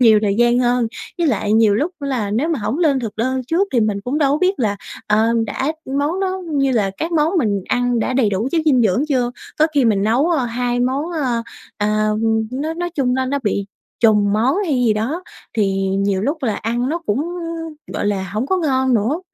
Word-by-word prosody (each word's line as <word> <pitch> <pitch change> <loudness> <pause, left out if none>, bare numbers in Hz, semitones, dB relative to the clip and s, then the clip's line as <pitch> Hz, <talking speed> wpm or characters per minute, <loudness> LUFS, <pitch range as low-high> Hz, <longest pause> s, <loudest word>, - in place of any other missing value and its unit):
nhiều 225 -3 +6
thời 200 -2 +1
gian 240 0 +4
hơn. 245 -1 +2 0.3
Với 340 - +2
lại 215 -7 0
nhiều 220 -2 +4
lúc 295 - 0
là 255 -8 -2
nếu 240 +10 0
mà 325 -4 0
hổng 230 +6 -2
lên 295 -6 +2
thực 225 -4 -5
đơn 260 +4 0
trước 355 +8 +1
thì 245 - +3
mình 210 -2 0
cũng 250 +8 -2
đâu 280 -3 +3
có 295 - +1
biết 370 +3 +2
là, 210 -4 0 0.3
ờ, 215 +2 +3 0.2
đã 265 +8 -2 0.3
món 310 +7 0
đó 380 -1 -1
như 275 -2 +2
là 210 -5 +1
các 330 +2 -3
món 315 +1 +2
mình 205 - 0
ăn 245 -1 +1
đã 230 - -1
đầy 250 -5 +2
đủ 205 +5 -1
chất 335 - +2
dinh 265 -6 +4
dưỡng 220 +5 +2
chưa, 250 -4 +1 0.3
có 310 - +5
khi 280 -3 +3
mình 210 -4 +2
nấu, 240 +9 +2
ờ, 310 -7 +1
2 245 +1 -1
món, 260 +4 0
à, 255 -7 -1 0.4
à, 215 0 +1 0.4
nói 300 +5 -2
nói 350 +1 -3
chung 255 -4 +1
nó 260 0 0
nó 280 +2 -1
bị 200 -2 -1 0.3
trùng 210 -3 +4
món 240 - +2
hay 315 -6 0
gì 245 -3 +3
đó, 240 +12 -2 0.3
thì 200 -3 +2 0.3
nhiều 195 -1 0
lúc 290 +6 -2
là 225 -5 0
ăn 240 +3 -1
nó 325 +4 -1
cũng, 205 +6 +1 0.7
gọi - - -2
là, 190 -3 -1
hổng 215 +5 -1
có 375 - +1
ngon 260 -6 +1
nữa. 235 - +1
245 Hz, 225 wpm, -19 LUFS, 215-285 Hz, 0.7 s, nhiều